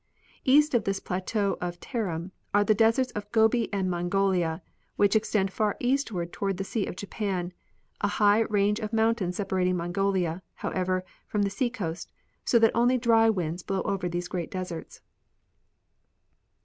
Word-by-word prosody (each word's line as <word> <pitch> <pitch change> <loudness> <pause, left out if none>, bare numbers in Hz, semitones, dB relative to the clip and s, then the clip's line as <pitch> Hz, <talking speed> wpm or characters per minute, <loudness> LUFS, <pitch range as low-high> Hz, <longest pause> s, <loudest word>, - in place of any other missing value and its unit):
East 295 +3 +5
of 235 -3 +3
this 195 0 -1
plateau 195 +3 -1
of 175 -1 -4
Tarim 190 -8 -3 0.2
are 205 - +5
the 215 - +4
deserts 225 +4 +3
of 210 0 -6
Gobi 225 0 +3
and 195 -2 0
Mongolia, 175 -1 0 0.3
which 205 +1 +3
extend 205 -3 +1
far 210 -2 0
eastward 240 -10 -1
toward 195 -2 -2
the 195 - -2
sea 205 +1 -2
of - - -5
Japan, 190 -3 -3 0.5
a - - +2
high 205 +1 +4
range 210 -1 +1
of 215 -1 -5
mountains 220 -5 +1
separating 185 -2 0
Mongolia, 180 0 0
however, 185 0 -1 0.2
from 210 -1 0
the 200 - 0
sea 240 +5 0
coast, 185 -9 -5 0.3
so 235 - +3
that 225 -1 +5
only 245 +2 +4
dry 225 -2 +4
winds 175 -4 -1
blow 190 +1 -2
over 185 -3 -1
these 175 +1 -3
great 175 -2 -4
deserts. 185 -3 -6
200 Hz, 160 wpm, -27 LUFS, 180-220 Hz, 0.5 s, East